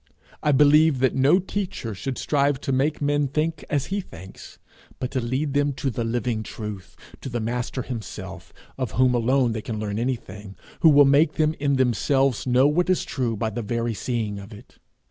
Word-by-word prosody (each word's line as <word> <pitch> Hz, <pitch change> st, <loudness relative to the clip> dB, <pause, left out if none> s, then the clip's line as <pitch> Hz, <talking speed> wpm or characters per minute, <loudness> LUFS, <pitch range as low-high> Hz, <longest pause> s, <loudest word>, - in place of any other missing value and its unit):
I 150 Hz, -, +2 dB
believe 150 Hz, +1 st, +5 dB
that 130 Hz, 0 st, +2 dB
no 135 Hz, +6 st, +4 dB
teacher 185 Hz, -, -4 dB
should 125 Hz, +7 st, -5 dB
strive 140 Hz, -2 st, +1 dB
to -, -, -2 dB
make 145 Hz, +3 st, 0 dB
men 145 Hz, 0 st, +1 dB
think 155 Hz, +4 st, -2 dB
as 145 Hz, -3 st, 0 dB
he 200 Hz, -, 0 dB
thinks, 95 Hz, -, -12 dB, 0.4 s
but 125 Hz, -, -4 dB
to 130 Hz, -2 st, -1 dB
lead 130 Hz, +5 st, -2 dB
them 145 Hz, 0 st, +1 dB
to 135 Hz, 0 st, -2 dB
the 115 Hz, -, -3 dB
living 115 Hz, -1 st, -1 dB
Truth, 105 Hz, -3 st, -8 dB, 0.3 s
to -, -, -6 dB
the 120 Hz, -1 st, -3 dB
Master 120 Hz, +3 st, -3 dB
himself, 95 Hz, -6 st, -7 dB, 0.3 s
of 130 Hz, -, -3 dB
whom 125 Hz, 0 st, +3 dB
alone 125 Hz, +1 st, +2 dB
they 110 Hz, -1 st, -3 dB
can 110 Hz, 0 st, -5 dB
learn 105 Hz, 0 st, -3 dB
anything, 105 Hz, -5 st, -4 dB, 0.2 s
who 165 Hz, -, +6 dB
will 145 Hz, -1 st, +7 dB
make 145 Hz, +3 st, +4 dB
them 155 Hz, -1 st, +1 dB
in 140 Hz, -1 st, +1 dB
themselves 130 Hz, +1 st, +1 dB
know 125 Hz, +2 st, +4 dB
what 175 Hz, +5 st, +1 dB
is 185 Hz, -, +1 dB
true 120 Hz, -4 st, -2 dB
by 110 Hz, +1 st, -2 dB
the 120 Hz, -, -4 dB
very 115 Hz, +1 st, -2 dB
seeing 105 Hz, -1 st, -3 dB
of 100 Hz, +3 st, -11 dB
it. 105 Hz, -, -15 dB
130 Hz, 195 wpm, -24 LUFS, 115-145 Hz, 0.4 s, will